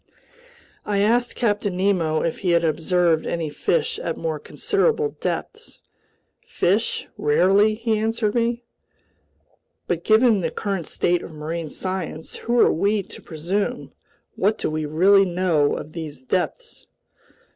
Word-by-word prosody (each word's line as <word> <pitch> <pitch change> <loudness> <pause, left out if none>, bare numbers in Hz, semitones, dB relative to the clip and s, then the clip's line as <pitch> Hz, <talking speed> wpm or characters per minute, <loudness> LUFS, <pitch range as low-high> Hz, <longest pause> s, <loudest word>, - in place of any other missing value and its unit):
I 205 -1 -1
asked 235 +4 +2
Captain 205 -5 0
Nemo 180 -5 +1
if 165 - -2
he 185 - -1
had 170 0 +3
observed 165 +1 +1
any 165 -3 -2
fish 450 - 0
at - - -3
more 485 -1 -3
considerable 445 +2 0
depths. 445 +1 -4 0.7
"Fish? 205 +6 0
Rarely!" 195 +8 +3
he 225 -1 0
answered 220 -1 0
me. 235 0 0 1.2
"But 170 -1 -2
given 220 -2 +4
the - - -1
current 195 -6 -3
state 175 0 0
of - - -9
marine 160 +1 -5
science, 185 -2 -5
who 240 +1 0
are - - +5
we 200 +4 +1
to - - -12
presume, 190 +9 -3 0.4
what 210 +3 +1
do - - -2
we 155 -1 -2
really 190 +6 +5
know 175 -5 +1
of 150 - -7
these 155 -5 -7
depths?" 190 - -3
190 Hz, 135 wpm, -23 LUFS, 165-220 Hz, 1.2 s, are